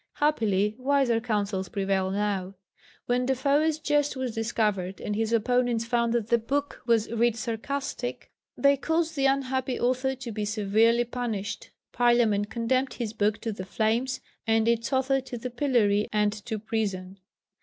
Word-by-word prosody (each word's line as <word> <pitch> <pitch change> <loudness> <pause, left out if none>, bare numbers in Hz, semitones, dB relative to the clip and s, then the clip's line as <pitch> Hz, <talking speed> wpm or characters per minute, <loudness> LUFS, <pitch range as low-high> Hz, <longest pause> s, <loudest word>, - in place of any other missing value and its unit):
Happily 215 -8 +1
wiser 265 -3 +2
counsels 205 -5 -1
prevail 195 -1 0
now. 195 -1 -2 0.5
When 250 +1 +1
Defoe's 285 +4 +2
jest 295 -2 +1
was 260 -3 -3
discovered, 210 -4 -1
and 210 - -3
his 220 +1 -1
opponents 235 0 +1
found 235 0 +1
that 230 -2 -1
the 235 - +4
book 280 +5 -2
was 225 -2 +2
"writ 235 0 +2
sarcastic," 245 +2 -4 0.3
they 280 0 +4
caused 320 +3 0
the 275 -1 +3
unhappy 265 -1 0
author 255 +2 +1
to 260 -2 -7
be 215 0 -3
severely 220 +3 +2
punished. 230 -4 -4 0.2
Parliament 235 -4 +3
condemned 255 +3 0
his 225 -3 -4
book 215 0 +1
to 225 - -2
the 200 -3 -6
flames, 225 +6 0 0.3
and 225 0 +3
its 235 +2 +1
author 265 0 +2
to 255 -1 -7
the 250 +2 -5
pillory 235 -6 +2
and 210 -1 +2
to 220 -2 -3
prison. 200 -4 -3
235 Hz, 155 wpm, -27 LUFS, 210-260 Hz, 0.5 s, the